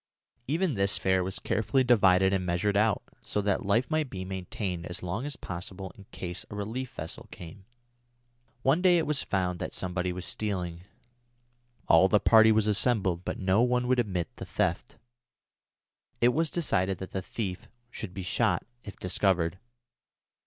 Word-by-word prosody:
Even 165 +3 +1
this 100 -2 +1
fare 95 -1 +2
was 95 +1 -2
carefully 115 +6 +1
divided 95 -6 +4
and 95 -1 +1
measured 90 +3 0
out, 105 0 +2 0.2
so - - -2
that 100 -1 0
life 115 +9 +2
might 155 -3 +1
be 95 -3 -6
maintained 95 -2 -4
as 90 - -5
long 100 +10 -3
as 145 - -4
possible 95 +2 -6
in 100 - -14
case 90 -2 -6
a - - -7
relief 115 +6 -4
vessel 80 +1 -7
came. 90 +3 -11 1.0
One 140 +6 +3
day 180 -1 +5
it 165 - +1
was 150 -2 +1
found 90 -2 -1
that - - -4
somebody 90 0 -2
was 90 0 -5
stealing. 90 -5 -3 1.0
All 80 +3 +6
the 105 +2 +4
party 110 0 +6
was 110 -1 +3
assembled, 100 -5 +1
but - - -3
no 95 +3 +2
one 125 0 +2
would 130 0 +3
admit 90 -8 -2
the - - -6
theft. - - -1 1.2
It 120 - +5
was 160 +5 +1
decided 95 - 0
that 95 - -8
the 95 - -2
thief 95 -1 -5 0.2
should 95 -7 -7
be 95 - -4
shot 90 - +1 0.2
if 100 - -9
discovered. 90 -1 +1
100 Hz, 165 wpm, -28 LUFS, 90-115 Hz, 1.2 s, All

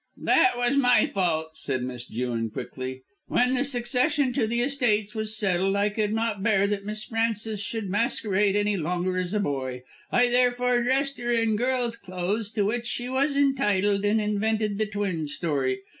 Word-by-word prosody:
"That 380 -9 +4
was 245 +3 +1
my 250 -3 +4
fault," 165 -5 -1
said 130 -5 -1
Miss 125 -1 -5
Jewin 115 -1 -2
quickly. 130 +3 -6 0.2
"When 250 +1 +2
the 260 +1 +1
succession 260 +1 +1
to 240 -4 +1
the 235 +2 0
estates 240 -6 +1
was 215 0 -2
settled 195 -1 +1
I 200 +1 +2
could 210 0 -1
not 225 -2 -1
bear 200 -2 +3
that 200 -1 -2
Miss 215 +1 -3
Frances 225 -2 -1
should 215 +1 -4
masquerade 205 -1 +1
any 205 0 +1
longer 180 +2 -1
as 185 +3 -2
a - - +2
boy. 130 -7 -3 0.3
I 245 0 +4
therefore 245 0 +2
dressed 270 +3 0
her 240 0 -3
in 230 -2 +2
girl's 245 0 0
clothes, 195 +1 -3
to 205 -2 +1
which 235 +3 -1
she 245 +1 -2
was 275 +2 +1
entitled, 205 -8 +2
and 210 +2 +2
invented 210 0 0
the 215 - +1
twin 195 -7 -2
story. 140 -4 -2
210 Hz, 175 wpm, -26 LUFS, 190-240 Hz, 0.3 s, That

